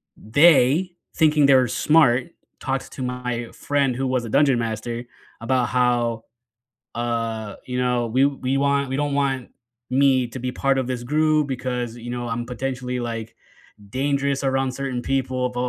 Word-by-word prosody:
they, 145 - +4 0.2
thinking 150 -3 +4
they 135 - +6
were 130 -1 +4
smart, 130 0 +3 0.3
talks 135 -1 -3
to 135 - -9
my 125 -2 -3
friend 140 -3 0
who 135 +2 -2
was 130 -2 0
a - - -6
Dungeon 140 0 +3
Master 115 +1 -3 0.4
about 125 +1 +1
how, 120 -2 +1 0.7
uh, 115 -2 -3
you 125 0 -3
know, 125 -1 +1
we 130 +4 +2
we 135 -1 0
want 140 0 +1
we 130 - -2
don't 145 0 -1
want 135 -3 0 0.4
me 130 -2 +3
to 125 - -8
be 125 0 -3
part 135 0 +1
of 130 - -1
this 125 -1 -3
group 155 +3 +2
because, 125 -3 -3
you 120 0 -8
know, 120 0 -4
I'm 115 +1 -3
potentially, 125 0 -4
like, 115 -2 -5 0.5
dangerous 140 +1 0
around 135 -1 0
certain 130 -2 -4
people, 130 -1 -1
blah 125 0 -4
130 Hz, 165 wpm, -23 LUFS, 120-135 Hz, 0.7 s, they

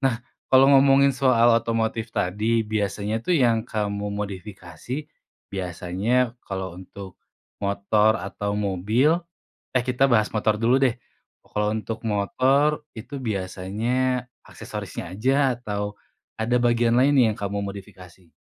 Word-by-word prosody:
Nah 135 -4 +1 0.3
kalo 130 0 +6
ngomongin 140 0 +5
soal 120 -3 +4
otomotif 115 0 -2
tadi, 110 +2 0
biasanya 105 +1 -2
tuh 175 +6 +1
yang 120 -3 +2
kamu 105 -1 -2
modifikasi, 100 +5 -6 0.5
biasanya 95 +7 -1
kalo 95 -2 -5
untuk 95 +1 -11 0.4
motor 105 +2 +2
atau 100 +1 -4
mobil 105 - +2 0.6
eh 125 -2 +1
kita 125 +2 +1
bahas 110 -2 +4
motor 110 0 +1
dulu 115 +3 +3
deh. 125 -2 +1 0.4
Kalo 105 0 -2
untuk 110 +1 -4
motor, 130 +8 +1
itu 125 +5 -9
biasanya 115 +6 -1 0.2
aksesorisnya 90 +2 -7
aja 130 +3 +2
atau 105 -3 -4 0.4
ada 110 +2 0
bagian 120 0 +3
lainnya 130 -4 +4
yang - - -7
kamu 100 0 -2
modifikasi? 95 -3 -10
110 Hz, 120 wpm, -24 LUFS, 100-125 Hz, 0.6 s, kalo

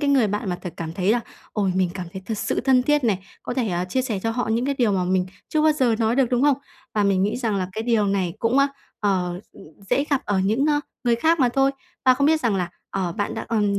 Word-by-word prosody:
cái 285 -1 +1
người 260 -6 +4
bạn 205 -1 -2
mà 175 - -3
thật 180 - -5
cảm 165 -1 -5
thấy 190 +4 +1
là 240 - +2 0.3
"Ôi, 195 -4 0
mình 185 -2 +2
cảm 180 -2 -5
thấy 190 - -7
thật 220 -2 -3
sự - - -1
thân 260 -2 +4
thiết 295 -1 +2
này, 205 -5 +2 0.2
có 245 - -4
thể, 245 -5 0
à, 175 0 -1
chia 255 +8 -1
sẻ 225 -7 -2
cho 225 - 0
họ 245 0 -2
những 235 +3 +1
cái 280 0 0
điều 225 -5 +3
mà 185 -2 +1
mình 185 0 +1 0.2
chưa 310 -1 +1
bao 310 -1 +5
giờ 250 -6 +2
nói 225 +2 +1
được", 270 -2 +4
đúng 245 +1 +2
hông? 285 -2 +4 0.4
Và 210 - +2
mình 190 -1 +2
nghĩ 205 - 0
rằng 225 -5 -1
là 185 -1 -1
cái 220 +2 -3
điều 225 -3 +2
này 190 -4 0
cũng, 235 +4 +2
ơ, 275 - +5 0.3
ờ, 185 -3 0
ừm, - - -14 0.3
dễ 280 - +3
gặp 280 - +2
ở 205 -2 0
những, 220 +10 +2
ơ, 295 -1 +2 0.2
người 235 -1 +3
khác 320 +4 +2
mà 250 - +5
thôi. 270 +2 +2 0.3
Và 255 - +6
không 280 +2 +2
biết 315 0 +3
rằng 225 -5 +1
là, 175 -2 -2 0.2
ờ, 185 -3 -2
bạn 205 -1 -2
đã - - -4
ừm, 205 -3 +1
225 Hz, 285 wpm, -23 LUFS, 190-260 Hz, 0.4 s, Và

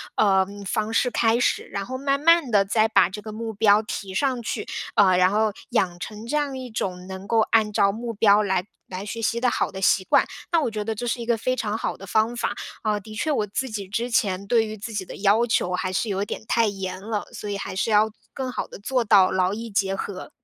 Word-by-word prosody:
呃， 190 -2 +4 0.2
方 215 +3 -1
式 245 +1 +2
开 225 0 +2
始， - - +1
然 200 0 -5
后 260 +1 -5
慢 275 +1 +1
慢 330 -2 +4
地 205 -2 +5
再 215 +3 +2
把 200 -5 +4
这 210 +2 -7
个 215 0 -8
目 225 0 -4
标 210 0 +4
提 195 -3 -6
上 255 +3 0
去。 220 -1 -4 0.3
呃， 185 -3 +5
然 185 0 +5
后 215 +1 +2 0.2
养 175 -2 0
成 215 +3 -7
这 300 +6 -1
样 280 -3 -1
一 255 -1 -7
种 180 -4 -3
能 190 +1 -8
够 225 0 +3
按 215 -2 +3
照 200 0 +3
目 230 +2 -5
标 210 0 +4
来 185 -2 0 0.2
来 190 +2 -6
学 230 +2 -5
习 230 +2 0
的 250 - +3
好 - - 0
的 190 - -6
习 185 0 +3
惯。 - - +4 0.3
那 330 - +4
我 240 - -1
觉 210 -1 -4
得 225 -1 -2
这 245 - -4
是 240 +1 -1
一 - - -5
个 235 0 +2
非 255 +3 -1
常 215 -4 -2
好 - - -3
的 195 - -11
方 220 +4 +2
法。 - - -1 0.3
啊， 210 -1 +1
的 215 +2 -11
确 220 +9 -2
我 220 -8 +1
自 250 +6 -3
己 200 -3 -5
之 235 +4 -2
前 200 -4 0
对 230 0 +3
于 215 0 -6
自 220 +2 -7
己 200 -2 -2
的 - - -10
要 210 +4 +3
求 180 -5 0
还 185 0 -1
是 205 +4 -1
有 200 0 -1
点 205 - -5
太 230 -1 +3
严 190 -2 -4
了， 210 0 -3
所 210 - -6
以 200 - -2
还 190 - -5
是 195 - 0
要 210 +1 +5
做 215 - -22 0.2
更 260 -2 -4
好 - - -3
地 - - -11
做 250 +4 0
到 200 -3 +5
劳 185 0 +1
逸 230 +1 -5
结 195 -1 0
合。 195 +6 -5
215 Hz, 275 characters per minute, -24 LUFS, 195-230 Hz, 0.3 s, 地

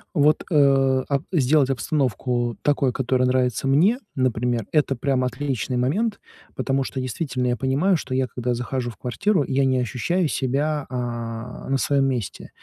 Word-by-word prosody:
Вот, 150 0 +3
э, 135 -3 +4
ап 140 +1 0
сделать 145 -3 +3
обстановку 125 -3 -1
такой, 140 -3 +2
которая 130 0 +1
нравится 125 0 +1
мне, 185 - +4 0.2
например, 120 -3 0
это 150 -3 +2
прям 130 0 0
отличный 125 -1 -2
момент, 195 - 0 0.4
потому 135 0 0
что 130 - -5
действительно 130 0 -2
я 120 0 0
понимаю, 145 - +2
что 130 -3 -4
я 130 0 +2
когда 125 0 -2
захожу 125 0 -3
в 115 - -11
квартиру, 145 - 0
я 135 0 +1
не 130 -1 +2
ощущаю 160 +9 0
себя, 145 +2 -1
а, 120 -1 -5
на 135 - +2
своём 140 0 +2
месте. 125 -7 -4
130 Hz, 155 wpm, -23 LUFS, 125-145 Hz, 0.4 s, э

